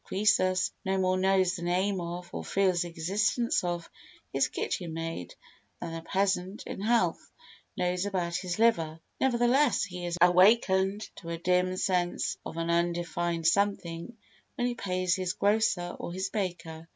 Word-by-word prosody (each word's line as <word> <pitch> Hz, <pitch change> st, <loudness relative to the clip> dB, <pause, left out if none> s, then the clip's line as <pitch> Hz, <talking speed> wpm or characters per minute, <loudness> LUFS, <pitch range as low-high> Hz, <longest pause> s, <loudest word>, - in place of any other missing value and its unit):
Croesus 185 Hz, -2 st, +2 dB
no 190 Hz, -1 st, 0 dB
more 185 Hz, 0 st, +2 dB
knows 190 Hz, -1 st, +3 dB
the 175 Hz, -, -7 dB
name 185 Hz, +2 st, 0 dB
of, 175 Hz, +1 st, -5 dB
or -, -, -4 dB
feels 190 Hz, -3 st, +1 dB
the 175 Hz, -, -2 dB
existence 205 Hz, +9 st, 0 dB
of, 175 Hz, -1 st, -3 dB, 0.5 s
his 135 Hz, 0 st, +3 dB
kitchen 170 Hz, -3 st, -3 dB
maid 165 Hz, -, -5 dB, 0.4 s
than 170 Hz, -1 st, -5 dB
a 165 Hz, -, -5 dB
peasant 190 Hz, +2 st, -1 dB
in -, -, -6 dB
health 230 Hz, +2 st, +1 dB, 0.5 s
knows 180 Hz, +2 st, 0 dB
about 175 Hz, -3 st, -2 dB
his 180 Hz, 0 st, -3 dB
liver; 165 Hz, -9 st, +2 dB, 0.2 s
nevertheless 260 Hz, +3 st, +3 dB
he 180 Hz, -3 st, -5 dB
is 175 Hz, 0 st, -3 dB
awakened 190 Hz, +2 st, +4 dB
to 170 Hz, -, -9 dB
a 170 Hz, -, -3 dB
dim 180 Hz, +2 st, +1 dB
sense 180 Hz, -2 st, 0 dB
of 165 Hz, -, -7 dB
an 165 Hz, 0 st, -1 dB
undefined 170 Hz, 0 st, -1 dB
something 195 Hz, +2 st, 0 dB, 0.4 s
when 245 Hz, -, -1 dB
he 245 Hz, -, 0 dB
pays 185 Hz, -5 st, 0 dB
his 185 Hz, -1 st, -2 dB
grocer 200 Hz, -4 st, +1 dB
or -, -, -5 dB
his 190 Hz, +2 st, -3 dB
baker. 165 Hz, -5 st, -4 dB
180 Hz, 155 wpm, -29 LUFS, 170-200 Hz, 0.5 s, awakened